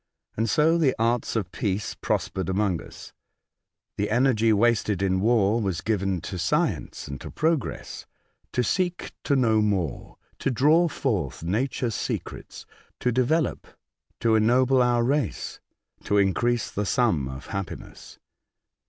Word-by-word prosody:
And 115 +1 0
so 160 +6 +3
the 140 -5 +3
arts 115 +1 0
of 100 -6 -2
peace 100 -1 -2
prospered 95 -2 -2
among 95 -3 0
us. - - -12 0.8
The 105 - -1
energy 115 -1 +3
wasted 105 -3 +2
in 95 -1 +1
war 110 0 +3
was 95 -5 -2
given 95 -4 -1
to 90 - -6
science 85 - -1
and 70 -2 -7
to - - -7
progress, 160 -4 -2 0.5
to 125 - +1
seek 180 +4 -1
to 140 - +2
know 115 -5 +3
more, 95 - -2 0.2
to - - 0
draw 150 +7 +4
forth 105 - -2
nature's 115 +5 -1
secrets, - - -5 0.3
to 125 - +1
develop, 130 +7 0 0.5
to 115 -1 +3
ennoble 125 +4 +4
our 120 -1 +3
race, 135 -2 -1 0.5
to 105 - +2
increase 115 +4 +1
the 105 0 -2
sum 100 - +1
of 65 +1 -8
happiness. 100 -3 -7
110 Hz, 135 wpm, -25 LUFS, 95-125 Hz, 0.8 s, draw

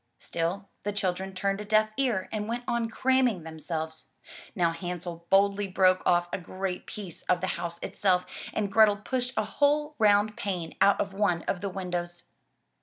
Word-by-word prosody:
'' - - -48
Still 175 +4 -3
the 205 - -2
children 190 -1 -2
turned 195 +2 -1
a - - -4
deaf 215 +1 +3
ear 235 -8 0
and 210 -1 -2
went 240 +2 -3
on 235 -1 0
cramming 250 -5 +2
themselves. 160 0 -5 0.5
Now 170 -3 +2
Hansel 175 0 -6
boldly 200 +1 +3
broke 185 0 +3
off 175 0 +3
a - - -1
great 185 +1 -4
piece 195 -6 -7
of 180 - +4
the 185 - -2
house 170 0 -4
itself 180 -2 +1 0.3
and 205 -2 -1
Grethel 210 -1 +6
pushed 250 +4 -2
a 215 - +2
whole 295 +3 +1
round 210 0 +4
pane 180 -6 -3
out 200 0 +5
of 195 - -1
one 195 -4 +1
of 180 - -2
the 200 - -2
windows. 175 -2 -4
195 Hz, 180 wpm, -28 LUFS, 175-210 Hz, 0.5 s, Grethel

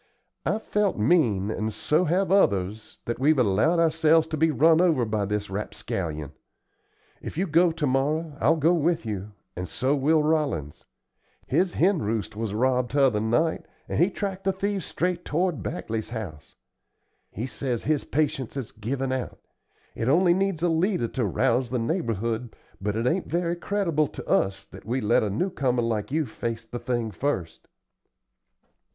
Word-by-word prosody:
"I've 220 +1 0
felt 210 -2 0
mean, 110 - +2
and 110 0 -2
so 155 - +1
have 180 +3 +1
others, 105 - +1
that 120 - -3
we've 150 +3 +4
allowed 125 - +3
ourselves 160 -1 +4
to 155 - -2
be 160 +2 +3
run 160 +2 +4
over 160 -9 +3
by 110 -2 -1
this 105 0 -3
rapscallion. 80 -6 -4 0.9
If - - -7
you 185 - +1
go 170 +1 +4
to 160 -2 -2
morrow, 145 +4 0
I'll - - +4
go 160 +2 +3
with 165 -3 +1
you, 105 -1 -5 0.2
and 90 +1 -4
so 130 - 0
will 150 +3 +3
Rollins. 150 - -1 0.6
His 185 -1 +1
hen 185 0 +3
roost 105 -3 -2
was 110 -1 -3
robbed 125 +3 +1
t'other 135 -7 +3
night, 160 +9 0 0.2
and - - -2
he 175 +4 +5
tracked 195 -1 -4
the 195 - +2
thieves 195 -1 -2
straight 180 0 -1
toward 175 +1 -1
Bagley's 110 -1 -4
house. 100 -11 -7 0.7
He 110 - -5
says 130 -3 -3
his 150 -1 +1
patience 145 -5 -1
has 135 -5 -5
given 130 +5 -3
out. 130 -1 -3 0.6
It 115 - -2
only 175 +4 +5
needs 190 -3 0
a 175 - +3
leader 165 - +1
to 125 -3 -1
rouse 120 +5 +1
the 125 - -1
neighborhood, 115 - -2 0.3
but 105 +1 -1
it 115 +2 -1
ain't 175 +8 0
very 170 0 0
creditable 170 -5 0
to - - -9
us 100 +1 +1
that - - -13
we 120 +4 -1
let 115 0 +3
a 105 - 0
new 180 - -1
comer 125 -6 0
like 115 0 -2
you 155 +1 +1
face 115 -1 -5
the 120 +2 -6
thing 120 -2 -2
first." 90 - -3
135 Hz, 170 wpm, -26 LUFS, 110-165 Hz, 0.9 s, he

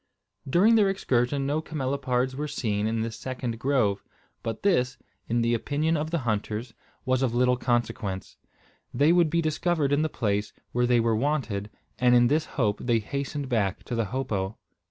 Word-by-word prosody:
During 195 - +5
their 210 -3 +5
excursion 135 -7 0
no 145 +3 0
camelopards 130 -4 -1
were 150 +2 -3
seen 110 -7 -1
in 110 0 -1
this 115 0 -3
second 125 -3 -4
grove; 120 -7 +1 0.4
but 115 -1 -5
this, 130 -11 +2 0.3
in 120 +1 +2
the 115 0 +2
opinion 150 +7 0
of 155 0 -1
the 170 - 0
hunters, 110 +1 -2 0.3
was 130 0 +1
of 125 -3 0
little 125 0 +3
consequence. 120 -6 -2 0.5
They 145 +6 +3
would 175 -2 +4
be 170 +1 +1
discovered 155 -2 +1
in 145 - +3
the 155 - 0
place 105 -5 -1 0.2
where 125 0 +1
they 120 -1 +4
were 115 -1 +2
wanted; 115 -6 -1 0.3
and 125 -1 +5
in 120 0 +5
this 155 +2 +2
hope 105 -6 +1
they 120 -2 +1
hastened 140 +5 -3
back 105 -6 0
to - - -6
the 115 -1 0
hopo. 105 -4 -3
125 Hz, 175 wpm, -27 LUFS, 115-145 Hz, 0.5 s, During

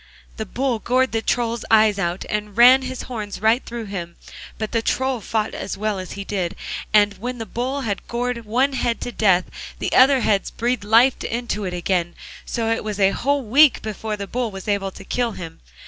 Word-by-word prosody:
The 220 -2 -4
Bull 255 +1 -1
gored 255 +3 +1
the 225 - 0
Troll's 235 0 -1
eyes 215 -2 +5
out 175 -1 -2
and 210 0 -4
ran 250 +3 +8
his 260 -1 -5
horns 215 -5 -6
right 225 +4 +3
through 235 -1 -6
him, 175 -4 -6 0.4
but 215 -1 -4
the 230 - +1
Troll 260 +1 -1
fought 220 +1 -2
as 195 - -5
well 210 -1 -1
as 185 - -7
he 200 - -6
did, 190 -4 -3 0.4
and 210 -1 +5
when 245 +3 -4
the 225 - -5
Bull 260 +5 -3
had 205 -6 -4
gored 240 0 -2
one 255 +6 +1
head 240 -3 -1
to 245 - -4
death 190 -6 +3 0.3
the - - -3
other 265 0 +6
heads 200 -3 +1
breathed 240 -1 -1
life 230 +5 +4
into 230 -3 -3
it 180 - -3
again, 175 -1 -1 0.3
so 225 -2 -1
it 230 - -1
was 210 -1 -4
a 195 0 +4
whole 280 +4 0
week 270 +5 +5
before 215 0 -4
the 200 - -4
Bull 240 +3 -2
was 195 -1 -9
able 200 -2 0
to 190 - -12
kill 235 +2 -1
him. 165 -3 -8
220 Hz, 210 wpm, -22 LUFS, 200-245 Hz, 0.4 s, ran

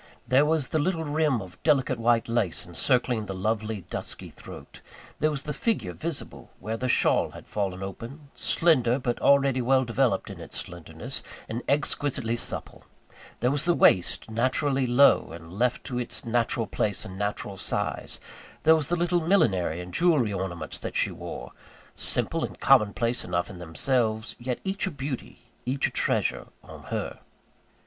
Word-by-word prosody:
There 135 +3 +5
was 155 -3 +1
the 155 - +1
little 160 +1 0
rim 150 -6 +1
of 90 -1 -14
delicate 130 -5 +2
white 115 0 +3
lace, 115 -7 0
encircling 110 - 0
the 95 - -4
lovely, 110 +1 -1
dusky - - -4
throat; - - -12 0.4
there 155 - +3
was 145 -3 -3
the 150 - -3
figure 225 - -1
visible, 165 -2 -5
where 110 +4 -3
the 125 +3 -2
shawl - - +3
had - - -11
fallen 95 -2 -3
open, 135 - -8
slender, 130 -8 +3
but 120 -3 -2
already 140 -2 +4
well 130 +2 +3
developed 120 -4 +1
in - - -9
its - - -4
slenderness, 85 -2 -5 0.3
and 115 +2 -3
exquisitely 140 -4 0
supple; 120 - -3 0.6
there 125 +2 +3
was 145 +2 +1
the 175 -1 +3
waist, 95 +4 +3
naturally 130 +3 +1
low, 125 +4 +5
and 85 0 -10
left 120 +5 0
to 125 -2 -3
its 120 -1 -2
natural 115 0 +1
place 105 -1 -1
and 95 - -8
natural 100 -1 -2
size; - - -2 0.4
there 160 +1 +7
were 160 - +1
the 160 +4 0
little 175 0 +1
millinery 100 - +2
and 90 0 -9
jewellery 155 - +3
ornaments 85 -4 -4
that - - -6
she - - +2
wore - - -7 0.4
simple - - 0
and - - -5
common 105 -1 +5
place 120 +2 -1
enough 85 +1 -2
in 90 - -10
themselves 110 +5 0
yet 125 0 -3
each 195 +1 -1
a - - 0
beauty, 140 -5 -6 0.2
each 135 +2 +1
a - - -7
treasure, - - 0 0.2
on - - -12
_her. - - -4
120 Hz, 170 wpm, -27 LUFS, 105-145 Hz, 0.6 s, there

